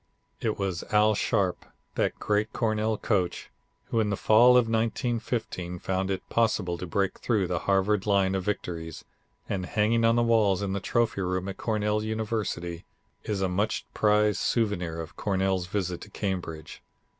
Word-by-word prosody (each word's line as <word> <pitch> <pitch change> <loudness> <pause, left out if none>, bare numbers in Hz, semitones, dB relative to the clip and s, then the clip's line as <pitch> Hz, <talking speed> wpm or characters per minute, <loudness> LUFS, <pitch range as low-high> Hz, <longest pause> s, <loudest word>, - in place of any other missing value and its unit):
It 110 -2 -1
was 95 -3 -2
Al 105 +1 +4
Sharpe, 100 -3 0 0.3
that - - 0
great 105 +1 0
Cornell 110 -1 0
coach, 95 -6 -1 0.4
who, 115 - +2
in 105 -2 +1
the 100 - -1
fall 120 +3 +6
of 120 -2 +4
1915 115 -5 -2
found 95 +2 -2
it 95 -1 -3
possible 105 -6 +1
to 90 - -5
break 95 +2 -1
through 110 -6 +1
the 90 -1 -1
Harvard 95 +1 +2
line 100 -2 +3
of 95 -1 -1
victories, 85 -5 -4 0.4
and 95 -2 -2
hanging 115 +2 +2
on 115 0 +4
the 120 - +3
walls 105 -4 +3
in 95 -1 -2
the 100 - -1
trophy 115 0 0
room 90 +1 -1
at 95 - -5
Cornell 105 -1 0
University 110 -6 -3 0.4
is 100 -3 -1
a - - +2
much 100 +4 -1
prized 105 0 +3
souvenir 90 -8 0
of 80 -1 -7
Cornell's 95 -2 0
visit 90 -2 -2
to - - -10
Cambridge. 85 -6 -4
100 Hz, 165 wpm, -27 LUFS, 95-110 Hz, 0.4 s, fall